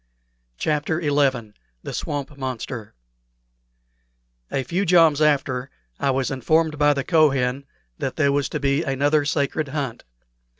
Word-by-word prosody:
CHAPTER 150 Hz, -, 0 dB
XI 140 Hz, -8 st, +1 dB, 0.3 s
THE -, -, -6 dB
SWAMP 145 Hz, 0 st, -4 dB
MONSTER 125 Hz, -, -6 dB, 1.5 s
A 135 Hz, -, -1 dB
few 175 Hz, +10 st, -1 dB
joms 165 Hz, -5 st, +4 dB
after, 135 Hz, -4 st, +1 dB, 0.3 s
I -, -, +1 dB
was 135 Hz, -1 st, 0 dB
informed 155 Hz, +4 st, +1 dB
by 145 Hz, 0 st, +4 dB
the 140 Hz, -, -1 dB
Kohen 140 Hz, -5 st, +2 dB, 0.3 s
that -, -, -3 dB
there 140 Hz, -, +2 dB
was 145 Hz, 0 st, 0 dB
to 150 Hz, -, -3 dB
be 140 Hz, +1 st, +1 dB
another 145 Hz, 0 st, +1 dB
sacred 145 Hz, +1 st, -1 dB
hunt. 135 Hz, -4 st, -4 dB
140 Hz, 130 wpm, -23 LUFS, 135-150 Hz, 1.5 s, joms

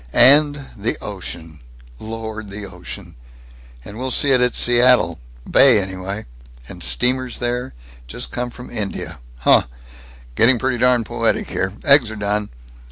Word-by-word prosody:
"And 145 Hz, 0 st, +5 dB
the 110 Hz, +2 st, -2 dB
ocean! 85 Hz, -6 st, -8 dB, 0.4 s
Lord! 110 Hz, -1 st, -7 dB
The 100 Hz, +1 st, -7 dB
ocean! -, -, -10 dB, 0.7 s
And 105 Hz, +3 st, -10 dB
we'll 130 Hz, +1 st, -3 dB
see 140 Hz, +2 st, +2 dB
it 130 Hz, -2 st, +4 dB
at 125 Hz, -1 st, +1 dB
Seattle. 120 Hz, -, +3 dB, 0.3 s
Bay, 130 Hz, -5 st, +5 dB
anyway. 95 Hz, +2 st, -5 dB, 0.4 s
And -, -, -11 dB
steamers 125 Hz, -, 0 dB
there 120 Hz, -, -3 dB, 0.3 s
just -, -, -5 dB
come 125 Hz, 0 st, -3 dB
from 125 Hz, +1 st, -12 dB
India! 105 Hz, -2 st, -4 dB, 0.2 s
Huh! -, -, +4 dB, 0.7 s
Getting 120 Hz, -, +4 dB
pretty 130 Hz, 0 st, -2 dB
darn 125 Hz, -1 st, +3 dB
poetic -, -, -1 dB
here! 95 Hz, -, -1 dB
Eggs 140 Hz, -5 st, +5 dB
are 110 Hz, -, -7 dB
done." 105 Hz, 0 st, -2 dB
115 Hz, 140 wpm, -19 LUFS, 100-125 Hz, 0.7 s, And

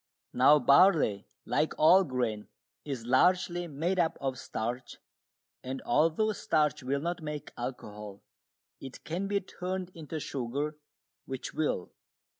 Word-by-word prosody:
Now 135 Hz, +4 st, +6 dB
barley, 140 Hz, -, +4 dB, 0.2 s
like 155 Hz, -, 0 dB
all 185 Hz, +5 st, +6 dB
grain, 120 Hz, -, -2 dB, 0.4 s
is 135 Hz, -6 st, -5 dB
largely 175 Hz, +6 st, +2 dB
made 170 Hz, +5 st, -1 dB
up 165 Hz, -2 st, +1 dB
of 135 Hz, -2 st, -3 dB
starch, 120 Hz, +3 st, -5 dB, 0.7 s
and 130 Hz, +1 st, -4 dB
although 165 Hz, -, +2 dB
starch 150 Hz, -7 st, +1 dB
will 135 Hz, +2 st, -1 dB
not 175 Hz, +2 st, -3 dB
make 150 Hz, -1 st, -6 dB
alcohol, 105 Hz, -5 st, -7 dB, 0.6 s
it 135 Hz, -1 st, -10 dB
can 180 Hz, +5 st, -3 dB
be 200 Hz, 0 st, +1 dB
turned 185 Hz, 0 st, -5 dB
into 160 Hz, -1 st, -6 dB
sugar, 140 Hz, +3 st, -3 dB, 0.5 s
which 130 Hz, -1 st, -5 dB
will. 150 Hz, -, -1 dB
150 Hz, 125 wpm, -30 LUFS, 125-175 Hz, 0.7 s, Now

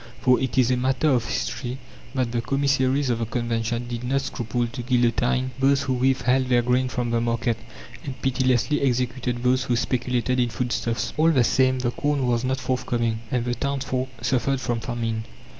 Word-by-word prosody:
For 125 Hz, -1 st, +4 dB
it 130 Hz, -1 st, -2 dB
is 130 Hz, -1 st, +4 dB
a 125 Hz, -, +2 dB
matter 130 Hz, +4 st, +1 dB
of 125 Hz, -4 st, +2 dB
history 125 Hz, +2 st, -3 dB, 0.4 s
that 125 Hz, -3 st, 0 dB
the 120 Hz, -1 st, 0 dB
commissaries 135 Hz, 0 st, +1 dB
of 115 Hz, -, -1 dB
the 115 Hz, -, -2 dB
Convention 115 Hz, 0 st, -2 dB
did 120 Hz, 0 st, -5 dB
not 135 Hz, +2 st, +1 dB
scruple 120 Hz, -2 st, -2 dB
to 120 Hz, +2 st, -6 dB
guillotine 125 Hz, +1 st, +1 dB
those 135 Hz, +1 st, +3 dB
who 135 Hz, -2 st, 0 dB
withheld 130 Hz, 0 st, +2 dB
their 120 Hz, -1 st, +4 dB
grain 125 Hz, +1 st, +2 dB
from 120 Hz, -2 st, -2 dB
the 115 Hz, 0 st, +1 dB
market, 115 Hz, 0 st, 0 dB, 0.5 s
and 135 Hz, -2 st, -6 dB
pitilessly 130 Hz, +2 st, +1 dB
executed 125 Hz, -1 st, -1 dB
those 130 Hz, +1 st, +2 dB
who 125 Hz, -, +1 dB
speculated 125 Hz, +1 st, 0 dB
in 120 Hz, -1 st, +2 dB
foodstuffs. 115 Hz, -2 st, -2 dB
All 160 Hz, +2 st, +4 dB
the 135 Hz, -7 st, +4 dB
same, 130 Hz, +2 st, +3 dB
the 125 Hz, -1 st, -1 dB
corn 145 Hz, 0 st, 0 dB
was 120 Hz, -1 st, +1 dB
not 130 Hz, +1 st, 0 dB
forthcoming, 120 Hz, -3 st, -1 dB
and 120 Hz, -1 st, -1 dB
the 120 Hz, -, 0 dB
townsfolk 130 Hz, -1 st, -2 dB
suffered 135 Hz, +1 st, +1 dB
from 120 Hz, -2 st, -1 dB
famine. 115 Hz, -2 st, -3 dB
125 Hz, 185 wpm, -24 LUFS, 120-130 Hz, 0.5 s, For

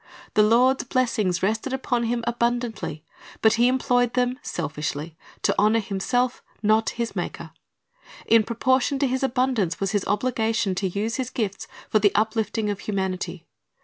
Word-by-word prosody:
The 215 Hz, -, +5 dB
Lord's 245 Hz, +5 st, +4 dB
blessings 230 Hz, -9 st, 0 dB
rested 220 Hz, +6 st, 0 dB
upon 245 Hz, -2 st, 0 dB
him 235 Hz, +1 st, -1 dB
abundantly, 235 Hz, -9 st, -2 dB, 0.4 s
but 220 Hz, -, +6 dB
he 240 Hz, +2 st, +4 dB
employed 245 Hz, -1 st, +2 dB
them 250 Hz, +1 st, +1 dB
selfishly, 150 Hz, 0 st, -4 dB, 0.3 s
to -, -, +3 dB
honor 215 Hz, +2 st, +4 dB
himself, 225 Hz, +5 st, -1 dB, 0.2 s
not 215 Hz, +1 st, +3 dB
his 235 Hz, -1 st, -2 dB
Maker. -, -, -5 dB, 0.7 s
In 230 Hz, 0 st, +5 dB
proportion 255 Hz, +5 st, +1 dB
to 275 Hz, -, +1 dB
his 260 Hz, 0 st, -1 dB
abundance 250 Hz, -8 st, 0 dB
was 195 Hz, -1 st, -1 dB
his 205 Hz, -3 st, 0 dB
obligation 225 Hz, -1 st, 0 dB
to 190 Hz, +1 st, -1 dB
use 210 Hz, +5 st, -2 dB
his 255 Hz, -2 st, -2 dB
gifts 205 Hz, -6 st, -3 dB, 0.2 s
for 215 Hz, -, +3 dB
the 205 Hz, -1 st, +4 dB
uplifting 215 Hz, 0 st, 0 dB
of 200 Hz, -, -5 dB
humanity. 185 Hz, -4 st, -3 dB
225 Hz, 150 wpm, -24 LUFS, 200-245 Hz, 0.7 s, but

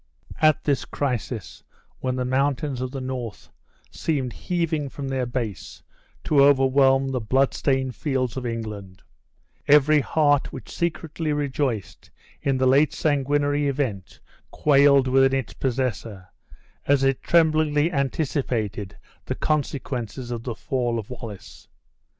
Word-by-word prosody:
At 155 Hz, 0 st, +4 dB
this 140 Hz, -4 st, +1 dB
crisis, 125 Hz, -6 st, -4 dB, 0.4 s
when 130 Hz, -1 st, -2 dB
the 125 Hz, -1 st, -2 dB
mountains 135 Hz, 0 st, 0 dB
of 130 Hz, -, -2 dB
the 135 Hz, +1 st, -6 dB
north 130 Hz, -4 st, -6 dB, 0.4 s
seemed 135 Hz, -6 st, -2 dB
heaving 165 Hz, -5 st, -2 dB
from 140 Hz, +1 st, -6 dB
their 130 Hz, -2 st, -1 dB
base, 120 Hz, -6 st, -5 dB, 0.4 s
to 140 Hz, -3 st, +4 dB
overwhelm 135 Hz, -1 st, +4 dB
the 130 Hz, -1 st, -1 dB
blood 130 Hz, +5 st, +2 dB
stained 130 Hz, -2 st, 0 dB
fields 130 Hz, -4 st, -2 dB
of 130 Hz, -, -4 dB
England, 105 Hz, -5 st, -6 dB, 0.6 s
every 150 Hz, +1 st, +6 dB
heart 145 Hz, 0 st, +2 dB
which -, -, -9 dB
secretly 165 Hz, -2 st, -2 dB
rejoiced 130 Hz, -, -3 dB, 0.3 s
in 135 Hz, -1 st, +1 dB
the 130 Hz, -, +1 dB
late 140 Hz, +4 st, +4 dB
sanguinary 145 Hz, 0 st, +1 dB
event 130 Hz, -9 st, -3 dB, 0.3 s
quailed 140 Hz, -2 st, +4 dB
within 135 Hz, +1 st, +4 dB
its 130 Hz, -, -7 dB
possessor, 115 Hz, -7 st, -3 dB, 0.6 s
as 140 Hz, -1 st, +3 dB
it 135 Hz, -1 st, +1 dB
tremblingly 155 Hz, -1 st, +3 dB
anticipated 130 Hz, -, -2 dB, 0.3 s
the -, -, -2 dB
consequences 130 Hz, -5 st, -3 dB
of 120 Hz, -1 st, -3 dB
the 120 Hz, -1 st, -5 dB
fall 125 Hz, -4 st, -1 dB
of 110 Hz, +1 st, -6 dB
Wallace. 115 Hz, -6 st, -9 dB
135 Hz, 125 wpm, -24 LUFS, 125-145 Hz, 0.6 s, every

